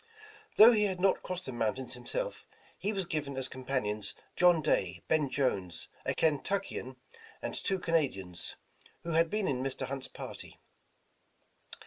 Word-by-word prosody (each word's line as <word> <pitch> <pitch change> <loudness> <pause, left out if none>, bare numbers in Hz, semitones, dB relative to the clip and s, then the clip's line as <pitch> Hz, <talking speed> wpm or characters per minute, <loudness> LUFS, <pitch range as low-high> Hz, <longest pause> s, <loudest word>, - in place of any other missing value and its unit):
Though 220 +3 +10
he 210 -3 +4
had 190 -3 -1
not 195 +1 +3
crossed 185 0 -5
the - - -4
moun 115 -3 0
tains 130 -1 -6
himself, - - -4 0.3
he 205 - -1
was 195 -3 -1
given 150 -6 -3
as 130 -1 0
campanions 110 -6 -2 0.2
John 175 -2 +6
Day, 90 - +1
Ben 155 -3 +2
Jones, 100 - -1 0.2
a - - +1
Kentuckian, 160 -3 0 0.4
and - - -4
two 190 - 0
Canadians, 130 - -1 0.5
who 170 - -3
had 165 +1 +4
been 210 0 0
in 130 -2 0
Mr. 135 0 -2
Hunt's 135 -1 -4
party. - - -8
140 Hz, 150 wpm, -32 LUFS, 125-180 Hz, 0.5 s, Though